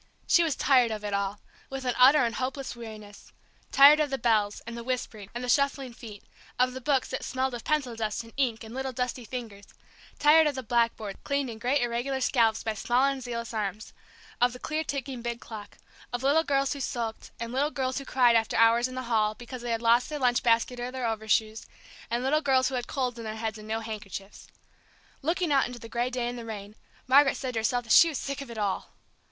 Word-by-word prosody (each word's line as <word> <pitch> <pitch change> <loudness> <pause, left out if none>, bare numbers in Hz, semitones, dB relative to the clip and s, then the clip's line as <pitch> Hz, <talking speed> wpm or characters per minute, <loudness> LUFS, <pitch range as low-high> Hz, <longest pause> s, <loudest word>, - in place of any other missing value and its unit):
She 345 - +5
was 315 -4 0
tired 255 -4 +4
of 215 -1 -5
it 205 - -3
all, 200 +1 -2 0.3
with 270 -1 -6
an 250 - +1
utter 265 +2 +6
and 230 - -2
hopeless 265 0 -4
weariness. 215 -3 -11 0.4
Tired 285 +2 +8
of 300 -1 +1
the 270 - -1
bells, 215 -4 +1
and 235 0 -7
the 235 - -6
whispering, 230 -5 -4
and 240 - -4
the - - -4
shuffling 275 -1 +1
feet, 220 -4 -11 0.3
of 250 0 +2
the 260 - -7
books 270 0 +1
that - - -4
smelled 260 0 -1
of 240 - -6
pencil 280 -6 0
dust 220 0 -3
and 230 - -15
ink 240 -5 0
and 220 +1 -10
little 265 0 -3
dusty 250 0 -3
fingers; 220 -4 -7 0.5
tired 310 +1 +6
of 290 - -1
the 260 - -4
blackboards, 230 -3 0
cleaned 280 -3 -1
in 220 - -9
great 255 +4 +1
irregular 240 +3 -1
scallops 230 -4 +2
by 220 - -1
small 245 +5 +1
and 275 -1 -1
zealous 235 -1 -5
arms; 210 0 -4 0.5
of 245 0 +4
the - - -8
clear 310 +4 -2
ticking 270 -4 -4
big 235 0 -4
clock; 210 -4 -10 0.3
of 245 +1 -3
little 290 +4 +4
girls 275 -2 +1
who 285 - -7
sulked, 235 -4 -4
and 235 +1 -5
little 280 +3 +1
girls 260 -2 -2
who - - -7
cried 250 -3 +3
after 225 -1 +1
hours 230 +2 +5
in 255 - -9
the 255 - -4
hall 215 -3 +1
because 240 +2 -9
they 240 - -5
had 230 0 -1
lost 235 +2 +4
their 300 - -3
lunch 250 -3 +2
baskets 235 +1 +1
or 245 - -3
their 255 -1 -4
overshoes, 220 0 0 0.4
and 235 +1 -1
little 300 +4 +2
girls 265 -3 +3
who - - -8
had 245 -2 -2
colds 250 -3 -2
in - - -6
their 215 0 -5
heads, 220 0 -4
and 215 - -11
no 220 +1 -2
handkerchiefs. 210 -3 -8 0.7
Looking 335 +2 0
out 275 -2 +3
into 245 0 -8
the 230 - -10
gray 240 +2 -1
day 250 -1 -2
and 245 0 -4
the - - -7
rain, 210 -2 -7 0.3
Margaret 275 +1 +5
said 260 -2 -4
to 225 - 0
herself 245 +2 0
that 225 - +1
she 335 - +8
was 300 - -3
sick 280 0 -4
of 275 - -8
it 235 - -8
all! 205 -3 -2
245 Hz, 235 wpm, -28 LUFS, 225-265 Hz, 0.7 s, Tired